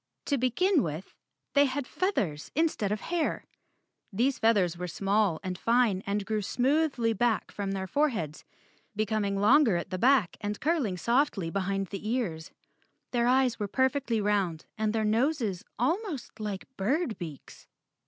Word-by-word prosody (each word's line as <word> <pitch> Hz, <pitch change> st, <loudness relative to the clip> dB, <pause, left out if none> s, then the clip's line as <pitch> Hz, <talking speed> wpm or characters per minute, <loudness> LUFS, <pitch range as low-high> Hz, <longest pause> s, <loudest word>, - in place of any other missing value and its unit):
To 285 Hz, -, +1 dB
begin 310 Hz, -, +2 dB
with, 160 Hz, +1 st, -5 dB, 0.4 s
they 285 Hz, 0 st, +6 dB
had 270 Hz, 0 st, -2 dB
feathers 200 Hz, -, -2 dB
instead 305 Hz, -10 st, +1 dB
of 210 Hz, -1 st, -2 dB
hair. 340 Hz, -2 st, -1 dB, 0.7 s
These 245 Hz, +7 st, +1 dB
feathers 200 Hz, -7 st, +3 dB
were 180 Hz, +1 st, -5 dB
small 195 Hz, 0 st, +1 dB
and 185 Hz, -1 st, -4 dB
fine 230 Hz, -5 st, +2 dB
and 200 Hz, 0 st, -1 dB
grew 215 Hz, 0 st, -1 dB
smoothly 255 Hz, +1 st, +1 dB
back 230 Hz, +1 st, 0 dB
from 200 Hz, -1 st, -3 dB
their 190 Hz, -1 st, -3 dB
foreheads, 205 Hz, -, -1 dB, 0.5 s
becoming 210 Hz, -2 st, 0 dB
longer 235 Hz, 0 st, +5 dB
at 170 Hz, -, -5 dB
the 185 Hz, -, -3 dB
back 250 Hz, -6 st, +3 dB
and 205 Hz, 0 st, -3 dB
curling 280 Hz, -, 0 dB
softly 235 Hz, -, +1 dB
behind 195 Hz, 0 st, -1 dB
the 205 Hz, +2 st, -5 dB
ears. 180 Hz, -10 st, -2 dB, 0.6 s
Their 240 Hz, -1 st, +2 dB
eyes 255 Hz, -2 st, +3 dB
were 205 Hz, -, -1 dB
perfectly 260 Hz, 0 st, +1 dB
round 200 Hz, -6 st, 0 dB
and 220 Hz, -1 st, 0 dB
their 220 Hz, 0 st, 0 dB
noses 225 Hz, -, 0 dB
almost 305 Hz, -, -2 dB
like 205 Hz, -3 st, -4 dB
bird 245 Hz, -, 0 dB
beaks. 160 Hz, -6 st, -9 dB
220 Hz, 150 wpm, -29 LUFS, 195-265 Hz, 0.7 s, they